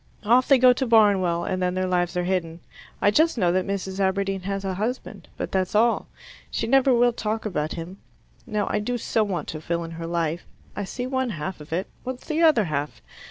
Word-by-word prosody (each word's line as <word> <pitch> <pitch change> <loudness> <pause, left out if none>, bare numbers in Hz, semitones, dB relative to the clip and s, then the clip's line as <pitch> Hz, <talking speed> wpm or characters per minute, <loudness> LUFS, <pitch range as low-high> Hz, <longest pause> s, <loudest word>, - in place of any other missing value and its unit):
Off 245 +4 +4
they 275 - +6
go 250 0 +6
to 265 +1 -2
Barnwell, 195 -7 +4
and 185 +1 -2
then 180 0 0
their 185 0 0
lives 180 -1 0
are 180 - +1
hidden. 175 -3 -2 0.4
I 205 - +5
just 320 +5 +3
know 180 -5 +2
that 185 +2 0
Mrs. 195 -1 -3
Aberdeen 195 0 0
has 195 0 -3
a 190 - -1
husband, 220 +7 -4
but - - -4
that's 190 +1 -1
all. 230 +2 +3 0.4
She - - -2
never 270 +2 +4
will 240 0 +4
talk 220 -1 -3
about 155 -7 -2
him. 175 +3 -7 0.5
Now 210 -3 -1
I 210 - +1
do 245 +4 -2
so 225 -1 0
want 195 -4 -3
to 155 - -5
fill 170 +1 -2
in 165 - -7
her 165 0 -6
life. 170 -1 -1 0.3
I 205 - -3
see 245 +6 -5
one 260 -1 -1
half 170 -3 -5
of 150 - -13
it. 180 +4 -1 0.2
What's 255 0 -6
the 315 +1 -1
other 310 -9 +5
half? 150 -4 -4
195 Hz, 220 wpm, -24 LUFS, 175-235 Hz, 0.5 s, they